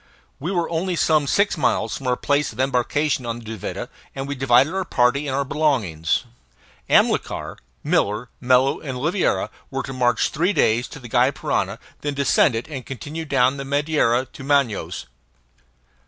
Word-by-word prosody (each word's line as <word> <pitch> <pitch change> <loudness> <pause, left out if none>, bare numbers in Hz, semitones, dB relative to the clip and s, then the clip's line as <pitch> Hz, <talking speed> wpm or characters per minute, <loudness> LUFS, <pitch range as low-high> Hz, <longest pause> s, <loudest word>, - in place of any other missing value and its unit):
We 165 +7 -3
were 175 -3 0
only 175 +2 -1
some 155 -3 +2
six 200 +4 +2
miles 155 - +1
from 135 - -6
our 125 - +2
place 145 +3 0
of 115 - -14
embarkation 135 +2 +1
on 115 -1 -3
the 120 - -11
Duvida, 110 -3 -5 0.3
and 135 0 -4
we 140 - -2
divided 135 +3 +3
our 190 0 -1
party 140 -2 +1
and 135 - -1
our 140 0 0
belongings. 115 - 0 0.7
Amilcar, - - +2 0.3
Miller, 105 +4 +1
Mello, 130 +2 +3
and 135 -4 -5
Oliveira 135 - 0 0.2
were 135 0 -3
to 135 - -6
march 120 -3 +2
three 175 +7 +1
days 120 - +2
to - - -10
the 125 - -10
Gy 120 +3 +3
Parana, 140 - -1
and - - -13 0.2
then 145 -1 -2
descend 140 -2 +3
it, 115 - -3
and 140 -4 -6
continue 145 +7 -6
down 130 -2 +2
the 140 - -4
Madeira 140 -3 +1
to 135 - -12
Manaos. 140 - 0
135 Hz, 175 wpm, -22 LUFS, 125-150 Hz, 0.7 s, divided